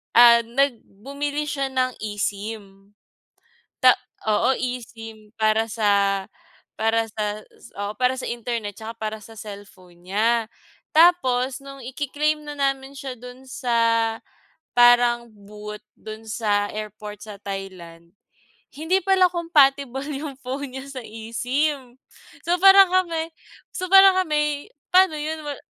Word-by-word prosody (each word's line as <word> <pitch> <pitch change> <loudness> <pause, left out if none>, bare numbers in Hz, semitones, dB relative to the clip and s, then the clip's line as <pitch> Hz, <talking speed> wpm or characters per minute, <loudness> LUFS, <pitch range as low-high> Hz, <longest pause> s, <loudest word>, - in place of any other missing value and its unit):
ah 235 0 +8
nag 260 0 +1 0.2
bumili 285 +2 -3
siya 280 -2 -2
ng 255 -1 0
eSIM. 205 -1 -5 0.8
Ta 255 -1 +6 0.3
oo, 215 +3 +2
eSIM 225 -3 -7
para 220 +1 +2
sa 200 -3 +1 0.5
para 225 +1 +1
sa 215 -1 -4
s- - - -17
oo, 205 +1 -3
para 255 +3 0
sa - - -5
internet 235 -3 -4
tsaka 225 +2 -9
para 220 -1 -4
sa 225 +2 -14
cellphone 185 -4 -12
niya. 225 +3 +1 0.4
Tapos 270 -6 +3
nung 275 -2 -11
ike-claim 295 +3 -1
na 295 -1 -8
namin 275 0 -2
siya 270 -1 -6
do'n 250 +2 -12
sa 230 -3 +1 0.6
parang 240 -1 +5
booth 210 0 -10 0.2
do'n 220 +1 -10
sa 205 -2 0
airport 210 0 -8
sa 210 -2 -10
Thailand. 180 -4 -8 0.6
Hindi 320 +6 0
pala 375 -1 +3
compatible 280 -6 +2
'yong 280 -1 -6
phone 265 +1 -5
niya 265 - -6
sa 260 - -6
eSIM. 245 +4 -3 0.5
So 350 +1 0
parang 390 -1 +8
kami 335 -3 0 0.4
so 370 0 -4
parang 390 0 +8
kami, 300 -3 -1 0.2
paano 370 -4 +5
'yon? 310 +1 -4
Wal 290 -2 -6
240 Hz, 130 wpm, -23 LUFS, 215-285 Hz, 0.8 s, ah